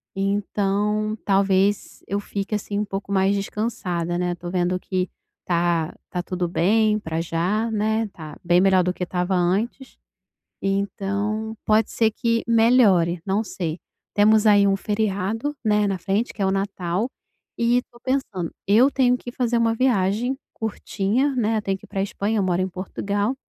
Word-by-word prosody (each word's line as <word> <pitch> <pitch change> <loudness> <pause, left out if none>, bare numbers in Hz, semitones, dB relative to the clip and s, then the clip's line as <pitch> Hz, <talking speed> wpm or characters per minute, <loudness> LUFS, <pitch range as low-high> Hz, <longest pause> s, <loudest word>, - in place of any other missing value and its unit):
e 195 - -2
então 205 +1 0
talvez 195 0 +1
eu 200 +1 -1
fique, 205 +1 -3
assim, 205 0 -3
um 210 - 0
pouco 195 0 -5
mais 195 +1 +3
descansada, 185 -5 -2
né, 180 0 0
tô 175 0 -7
vendo 180 0 0
que 185 -1 -2 0.4
tá 170 -2 +1 0.2
tá 180 - -2
tudo 180 -1 -2
bem 215 +5 +2
pra 165 -3 -3
já, 185 +7 0
né? 220 +1 0
Tá 155 -5 -10
bem 175 +1 +4
melhor 190 -2 +4
do 180 +1 0
que 180 - -4
tava 180 +1 -1
antes. 200 +9 -1 0.6
E 195 - 0
então 200 +3 -2
pode 215 0 +3
ser 220 -1 +2
que 230 +1 0
melhore, 225 -7 +4
não 200 +3 +1
sei. 170 -5 -4 0.3
Temos 215 +1 +4
aí 205 -1 +6
um 195 - +3
feriado, 210 +6 -1
né, 210 -1 +3
na 195 - -1
frente, 195 +6 -1
que 205 - -7
é - - +3
o 190 - +2
Natal 195 +2 -1 0.5
e 235 +1 +3
estou 240 -1 -5
pensando, 245 -10 -2 0.2
eu 235 +7 +6
tenho 250 -2 +3
que 245 - -8
fazer 240 -1 0
uma 230 -1 +2
viagem 235 +1 +1 0.2
curtinha, 220 +4 -1
né, 220 -2 +1
tenho 195 -1 -1
que - - -16
ir - - -21
para 195 - -2
Espanha. 205 +2 -1
Eu - - +2
moro 180 0 +1
em 185 - -1
Portugal 200 +5 -2
200 Hz, 170 wpm, -23 LUFS, 185-220 Hz, 0.6 s, aí